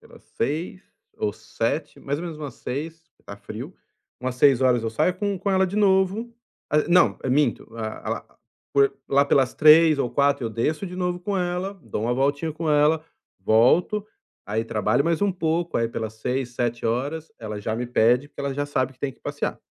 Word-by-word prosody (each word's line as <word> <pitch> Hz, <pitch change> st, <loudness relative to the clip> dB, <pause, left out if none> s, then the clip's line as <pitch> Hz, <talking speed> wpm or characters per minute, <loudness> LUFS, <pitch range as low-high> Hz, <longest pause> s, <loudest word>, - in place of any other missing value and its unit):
pelas -, -, -17 dB, 0.2 s
18h 165 Hz, +5 st, -2 dB, 0.4 s
ou 105 Hz, -, 0 dB
19h -, -, -3 dB
mais 140 Hz, +2 st, -2 dB
ou 175 Hz, -, -5 dB
menos 165 Hz, -3 st, -6 dB
umas 145 Hz, -5 st, -6 dB
18h 160 Hz, +5 st, -5 dB
porque -, -, -36 dB
tá 100 Hz, -, -9 dB
frio, 120 Hz, -, -8 dB, 0.5 s
umas 125 Hz, 0 st, -3 dB
18h 135 Hz, -2 st, +5 dB
eu 120 Hz, -3 st, +2 dB
saio 180 Hz, +10 st, +1 dB
com 200 Hz, +1 st, -2 dB
com 200 Hz, +2 st, -1 dB
ela 190 Hz, 0 st, +3 dB
de 195 Hz, -, -5 dB
novo, 205 Hz, +3 st, +2 dB, 0.4 s
ah, 150 Hz, -, +4 dB
não, 175 Hz, +1 st, +4 dB
minto, 135 Hz, -2 st, +1 dB
ah, 110 Hz, -1 st, -5 dB
lá -, -, -5 dB, 0.3 s
por 140 Hz, -1 st, +4 dB, 0.2 s
lá 140 Hz, +1 st, +4 dB
pelas 135 Hz, -3 st, +2 dB
15h 155 Hz, 0 st, +7 dB
ou 120 Hz, -, 0 dB
16h 140 Hz, -2 st, +2 dB
eu -, -, -4 dB
desço 150 Hz, -, -1 dB
de 180 Hz, +1 st, -8 dB
novo 180 Hz, -1 st, -2 dB
com 195 Hz, +2 st, -2 dB
ela, 180 Hz, +2 st, -2 dB
dou 105 Hz, -, -4 dB
uma 120 Hz, -, +1 dB
voltinha 145 Hz, +4 st, 0 dB
com 160 Hz, 0 st, -2 dB
ela, 150 Hz, +2 st, +3 dB, 0.3 s
volto, 125 Hz, -, +3 dB, 0.4 s
aí 110 Hz, +2 st, -1 dB
trabalho 110 Hz, +5 st, +1 dB
mais 165 Hz, -1 st, +1 dB
um 205 Hz, -1 st, +2 dB
pouco, 170 Hz, -1 st, -1 dB
aí 115 Hz, -1 st, +1 dB
pelas 110 Hz, -1 st, -5 dB
18h, 125 Hz, +3 st, -2 dB
19h, 120 Hz, +6 st, -2 dB
ela 105 Hz, -2 st, -6 dB
já 110 Hz, +2 st, -2 dB
me 120 Hz, +1 st, -3 dB
pede, 125 Hz, +3 st, +3 dB
porque -, -, -10 dB
ela 140 Hz, -1 st, -2 dB
já 145 Hz, -, -1 dB
sabe 130 Hz, -2 st, -1 dB
que -, -, -33 dB
tem 135 Hz, -2 st, -3 dB
que -, -, -27 dB
passear, -, -, -4 dB
145 Hz, 200 wpm, -24 LUFS, 120-170 Hz, 0.5 s, 15h